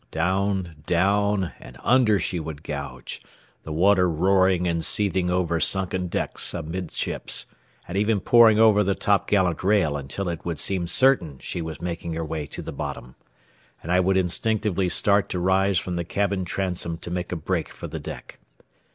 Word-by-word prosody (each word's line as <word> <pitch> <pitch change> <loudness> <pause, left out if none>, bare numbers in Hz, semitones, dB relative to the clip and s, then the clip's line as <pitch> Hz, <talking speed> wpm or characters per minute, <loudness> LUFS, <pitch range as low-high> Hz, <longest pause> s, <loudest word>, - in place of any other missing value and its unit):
Down, 95 0 -1
down, 100 0 +1
and 60 - -13
under 120 -4 +4
she 90 -2 -2
would 80 -1 -7
gouge, 70 -5 -6 0.4
the 80 - -8
water 90 +3 +3
roaring 95 +2 +2
and 85 -1 -1
seething 95 -1 +2
over 90 -2 0
sunken 95 0 +1
decks 85 - -1
amidships, 85 +1 -3 0.4
and 90 - -6
even 105 +1 +2
pouring 115 +1 +6
over 110 -2 +5
the 100 0 0
topgallant 95 -4 +1
rail 95 -7 +2
until 70 +7 -5
it 85 -2 -4
would 85 -2 -3
seem 90 0 -2
certain 90 - +2
she 85 - -5
was 80 -1 -6
making 85 -1 -4
her 80 0 -3
way 75 -1 -4
to - - -7
the - - -6
bottom, 60 +1 -6 0.7
and 85 - -4
I 90 - +4
would 95 +1 +2
instinctively 95 +1 0
start 100 +2 +2
to 90 - -2
rise 95 +1 +2
from 90 +1 -2
the 85 - -1
cabin 100 +1 -1
transom 90 -2 -2
to 85 +1 -8
make 90 0 -3
a - - -1
break 80 - -2
for - - -10
the - - -6
deck. - - -9
90 Hz, 170 wpm, -24 LUFS, 85-100 Hz, 0.7 s, pouring